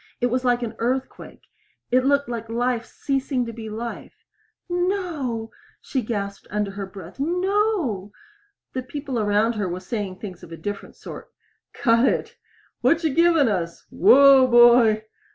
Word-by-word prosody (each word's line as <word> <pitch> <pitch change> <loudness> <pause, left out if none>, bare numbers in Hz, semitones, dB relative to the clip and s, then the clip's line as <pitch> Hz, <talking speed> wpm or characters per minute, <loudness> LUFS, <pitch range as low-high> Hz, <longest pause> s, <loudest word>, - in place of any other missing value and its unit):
It 245 -1 0
was 255 +1 0
like 245 -1 +1
an 230 -1 -4
earthquake 255 +3 -3 0.5
it 255 +1 +4
looked 280 +1 +2
like 230 -2 -5
life 240 0 -1
ceasing 270 -2 -2
to 230 - -6
be 220 -1 -7
life. 230 +2 -7 0.4
"No!" 350 - -2 0.3
she 265 - -2
gasped 200 -3 -4
under 210 -1 -2
her 195 0 -6
breath. 190 +6 -12
"No!" 355 - 0 0.6
The 255 - -2
people 270 -1 -5
around 210 +2 +2
her 205 -4 -2
were 175 +1 -4
saying 195 0 -4
things 185 -4 -9
of 165 - -13
a 165 - -7
different 205 +2 -6
sort. - - -10 0.4
"Cut 230 0 +3
it!" - - -1 0.5
"What 335 +1 +3
you 315 -4 +1
givin' 330 -3 +4
us?" 170 -5 -3
"Whoa, 275 -1 +7
boy!" 240 -3 +6
240 Hz, 150 wpm, -23 LUFS, 210-275 Hz, 0.6 s, Whoa